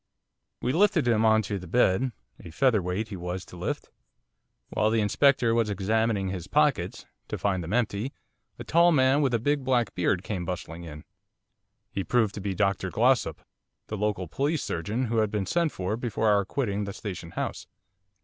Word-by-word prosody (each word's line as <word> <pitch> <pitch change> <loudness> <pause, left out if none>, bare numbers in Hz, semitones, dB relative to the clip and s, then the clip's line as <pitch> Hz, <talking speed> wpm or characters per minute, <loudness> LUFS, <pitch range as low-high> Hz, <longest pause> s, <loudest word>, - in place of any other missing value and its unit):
We 125 - +1
lifted 175 -5 +3
him 115 -2 +3
on 110 0 +4
to 100 0 -3
the 90 - -10
bed, 120 +4 +2 0.3
a - - -10
featherweight 105 -1 +1
he 100 - -5
was 90 +1 -5
to - - -13
lift. 90 - -4 0.8
While 110 - +1
the 115 0 +2
Inspector 120 +2 +3
was 115 -2 +2
examining 105 0 0
his 95 -3 -5
pockets - - +1 0.2
to - - -4
find 95 -3 0
them 80 - -6
empty 120 +1 0 0.5
a - - -7
tall 170 +2 +4
man 135 -1 +4
with 135 -3 +2
a - - +4
big 145 +4 0
black 125 -5 +1
beard 90 +1 0
came 95 -3 -3
bustling 85 -1 -5
in. 75 -2 -9 0.9
He 95 - -2
proved 110 -1 +1
to 100 - -6
be 95 -1 -2
Dr 100 -2 0
Glossop, 125 +5 +2 0.5
the 110 - -3
local 105 -3 -1
police 145 - -1
surgeon, 105 +10 -2
who 115 0 -1
had 110 -1 +2
been 105 -2 -2
sent 170 - +1
for 95 +3 -2
before 115 -2 0
our 100 -1 +3
quitting 105 -3 -2
the 100 - -5
Station 90 -6 -6
House. - - -3
105 Hz, 185 wpm, -27 LUFS, 95-125 Hz, 0.9 s, on